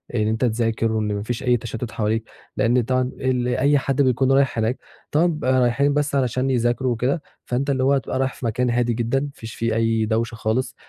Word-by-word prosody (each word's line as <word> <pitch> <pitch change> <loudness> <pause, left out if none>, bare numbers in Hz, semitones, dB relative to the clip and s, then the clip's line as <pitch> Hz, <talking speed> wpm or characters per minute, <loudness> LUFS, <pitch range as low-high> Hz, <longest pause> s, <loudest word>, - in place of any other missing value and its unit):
إن 105 -2 +1
أنت 110 +3 +1
تذاكر 115 -1 0
وإن 105 -1 -1
ما 100 0 -3
فيش 120 +3 -4
أي 125 -1 +3
تشتُّت 115 0 -6
حواليك، 110 +1 -1 0.3
لأن 120 +2 +3
طبعًا 130 +2 0 0.5
أي 145 +2 +4
حد 135 0 0
بيكون 130 0 +2
رايح 135 -2 +3
هناك 115 +3 0 0.3
طبعًا 155 +4 +3
بيبقى 150 -6 +1
رايحين 140 +4 +2
بس 145 -1 0
علشان 130 0 0
يذاكروا 125 0 +1
وكده، 125 +7 0 0.2
فأنت 130 +3 -1
اللي 130 -2 +1
هو 135 +2 +4
هتبقى 130 -1 -1
رايح 135 -1 0
في - - -8
مكان 125 +2 0
هادي 120 0 +1
جدًا، 120 +3 0
ما 145 +1 -4
فيش 110 -4 -9
فيه 115 -1 -1
أي 115 -1 +1
دوشه 115 +2 -1
خالص 115 +4 -1
125 Hz, 210 wpm, -22 LUFS, 115-135 Hz, 0.5 s, أي